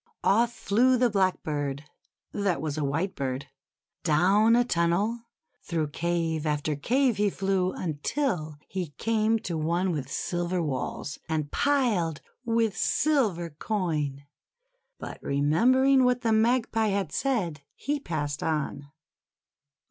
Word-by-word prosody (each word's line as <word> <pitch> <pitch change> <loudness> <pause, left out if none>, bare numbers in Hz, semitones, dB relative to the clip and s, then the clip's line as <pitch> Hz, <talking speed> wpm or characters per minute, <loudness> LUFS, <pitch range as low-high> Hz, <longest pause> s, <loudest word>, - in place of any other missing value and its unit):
Off 230 +4 +3
flew 245 +4 +2
the 245 -1 +2
Blackbird 150 -8 -1 0.5
that 195 -6 0
was 150 -1 -3
a 155 - -2
Whitebird. 140 -3 -2 0.6
Down 195 +8 +4
a 245 0 +3
tunnel, 205 +6 0 0.3
through 160 -4 -2
cave 165 -1 -1
after 150 0 0
cave, 250 - +1
he 205 0 +2
flew, 190 -1 0
until 160 - -2
he 180 -6 -5
came 225 0 +2
to 170 - -4
one 170 +4 0
with 140 -4 -4
silver 175 +1 -1
walls, 135 -2 -3
and 155 -2 -2
piled 225 - +1 0.2
with 225 -3 +1
silver 215 - +1
coin. 150 -6 -2 0.7
But - - -8
remembering 255 - +3
what 250 -1 +2
the 225 -3 +2
Magpie 225 0 +2
had 195 -6 -1
said, 185 - -1
he 290 +1 -2
passed 145 - -3
on. 150 -2 -2
180 Hz, 120 wpm, -27 LUFS, 155-225 Hz, 0.7 s, Down